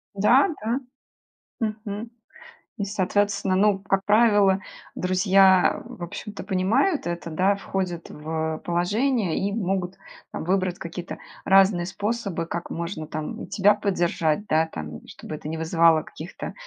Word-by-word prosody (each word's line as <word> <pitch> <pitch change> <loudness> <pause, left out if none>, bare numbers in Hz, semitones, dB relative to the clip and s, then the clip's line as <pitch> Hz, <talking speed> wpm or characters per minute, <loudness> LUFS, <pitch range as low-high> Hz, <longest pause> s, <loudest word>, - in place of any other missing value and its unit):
Да, 235 - +5
да. 230 +4 0 0.8
Мгм. 215 0 -4 0.7
И, 200 - -1
соответственно, 200 0 0
ну, 200 0 +3
как 195 0 -1
правило, 205 -3 +4 0.3
друзья, 185 0 +4
в - - -10
общем-то, 190 +4 -7
понимают 215 - +1
это, 170 -1 -4
да, 185 +5 +2
входят 185 -4 -4
в 160 +1 -3
положение 200 - +1
и 200 - -1
могут, 190 -3 -1 0.4
там, - - -5
выбрать 185 0 0
какие-то 170 +1 -6 0.3
разные 190 -2 +5
способы, 200 -2 -3
как 170 +1 -5
можно, 165 -2 -5
там, 155 0 -5
и - - -9
тебя 205 0 +4
поддержать, 175 -2 0
да, 160 -1 +2
там. 75 - -7
Чтобы - - -9
это 150 - -8
не 160 - -3
вызывало 160 0 +3
каких-то 160 +4 -8
190 Hz, 135 wpm, -24 LUFS, 170-205 Hz, 0.8 s, Да